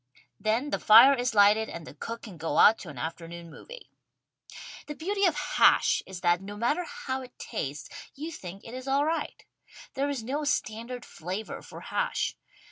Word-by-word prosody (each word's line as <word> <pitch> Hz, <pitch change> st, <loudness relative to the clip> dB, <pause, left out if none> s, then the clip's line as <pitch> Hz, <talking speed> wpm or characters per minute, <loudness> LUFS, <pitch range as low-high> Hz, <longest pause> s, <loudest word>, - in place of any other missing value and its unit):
Then 225 Hz, +8 st, 0 dB
the -, -, 0 dB
fire 235 Hz, +6 st, +8 dB
is 245 Hz, -3 st, -1 dB
lighted 210 Hz, +2 st, +5 dB
and 170 Hz, -2 st, -7 dB
the -, -, -10 dB
cook 230 Hz, +10 st, -7 dB
can 200 Hz, -7 st, -10 dB
go 160 Hz, +1 st, -2 dB
out 220 Hz, -, +7 dB
to 175 Hz, -, -9 dB
an 145 Hz, -, -10 dB
afternoon 165 Hz, +3 st, -6 dB
movie. -, -, -12 dB, 1.0 s
The 300 Hz, -, -6 dB
beauty 395 Hz, +6 st, 0 dB
of 340 Hz, -4 st, +3 dB
hash 295 Hz, -, +3 dB
is 185 Hz, -1 st, -8 dB
that, 175 Hz, 0 st, +2 dB
no 205 Hz, +1 st, -8 dB
matter 295 Hz, +11 st, 0 dB
how 475 Hz, -, -5 dB
it 255 Hz, -1 st, -13 dB
tastes, 145 Hz, -, -5 dB, 0.3 s
you 310 Hz, +4 st, -6 dB
think 195 Hz, -, -9 dB
it 230 Hz, -, -10 dB
is 255 Hz, +1 st, -7 dB
all 275 Hz, +2 st, +2 dB
right. 325 Hz, +1 st, -3 dB, 0.5 s
There 280 Hz, +1 st, -1 dB
is 270 Hz, -5 st, -3 dB
no 280 Hz, +6 st, -2 dB
standard 240 Hz, -3 st, -2 dB
flavor 185 Hz, +6 st, -6 dB
for -, -, -11 dB
hash. -, -, -1 dB
230 Hz, 185 wpm, -28 LUFS, 190-285 Hz, 1.0 s, fire